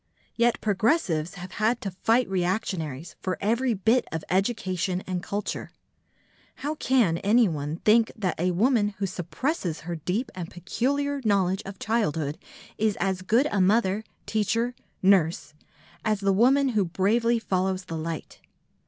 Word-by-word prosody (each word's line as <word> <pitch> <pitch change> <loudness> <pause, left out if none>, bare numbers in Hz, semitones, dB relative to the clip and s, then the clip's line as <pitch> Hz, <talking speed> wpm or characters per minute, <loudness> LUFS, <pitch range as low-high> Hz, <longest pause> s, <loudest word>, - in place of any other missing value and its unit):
Yet 235 0 +2
progressives 200 - +1
have 180 0 -8
had 225 +3 +1
to 195 - -3
fight 225 +7 +2
reactionaries 175 -5 -2
for 185 -1 -2
every 235 +4 +1
bit 225 +6 +2
of 160 -1 -3
education 185 -2 0
and 180 -1 -3
culture. 205 +3 -4 0.9
How 290 +3 -3
can 245 - +2
anyone 180 -9 +2
think 225 +1 +5
that 190 -9 -2
a 180 +2 +2
woman 210 +2 +2
who 200 - -1
suppresses 180 - -3
her 170 +1 -5
deep 185 - -2
and 180 -3 -6
peculiar 275 - -1
knowledge 195 -3 +2
of 195 0 -7
childhood 160 -10 -1 0.4
is 215 -1 +1
as 190 -1 0
good 230 +9 +3
a 200 - +2
mother, 200 +1 +2 0.2
teacher, 230 +3 0 0.3
nurse 170 -6 +3 0.5
as 215 -2 +1
the 195 0 +2
woman 265 +7 +4
who 215 -5 +2
bravely 220 +7 +2
follows 190 -3 -1
the 165 - -5
light? 160 0 -5
195 Hz, 145 wpm, -26 LUFS, 180-230 Hz, 0.9 s, think